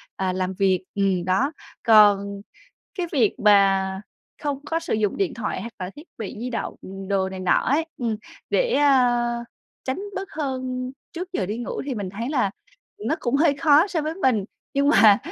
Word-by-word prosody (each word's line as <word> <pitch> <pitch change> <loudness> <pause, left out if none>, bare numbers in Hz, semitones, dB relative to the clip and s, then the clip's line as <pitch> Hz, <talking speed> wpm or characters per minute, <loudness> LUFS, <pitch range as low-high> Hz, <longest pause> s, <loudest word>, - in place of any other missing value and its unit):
à, 190 -1 -1
làm 185 0 -2
việc, 190 -1 +1
ừm, 195 -3 +1
đó. 190 +11 +2 0.3
Còn 200 -2 +5 0.6
cái 355 - 0
việc 240 -8 +3
mà 195 -2 +4 0.4
không 285 -2 -1
có 330 +2 -1
sử 330 - -2
dụng 215 -2 0
điện 390 -5 0
thoại 230 - -3
hoặc 230 +4 -7
là 180 -1 -4
thiết 295 - -9 0.2
bị 215 -2 -5
di 250 +2 -3
động 235 - -3 0.3
đồ 195 -1 +1
này 190 0 -7
nọ 185 - +2
ấy, 295 +5 +2
ừm, 230 -3 -1 0.3
để, - - +2
a, 245 -4 +3 0.4
tránh 260 +7 -2
bớt 385 0 -4
hơn 255 -3 -3 0.2
trước 360 +2 -6
giờ 195 - -1
đi 210 +4 -3
ngủ 240 - -4
thì 270 - -2
mình 205 -4 -4
thấy 230 +5 -4
là 250 -9 +1 0.6
nó 315 - +1
cũng 245 +2 +1
hơi 295 -1 +4
khó 305 +3 +5
so 350 -5 -1
với 310 +2 -3
mình, 255 - +1 0.3
nhưng 280 +1 +3
mà 215 -9 +7
240 Hz, 190 wpm, -24 LUFS, 200-285 Hz, 0.6 s, mà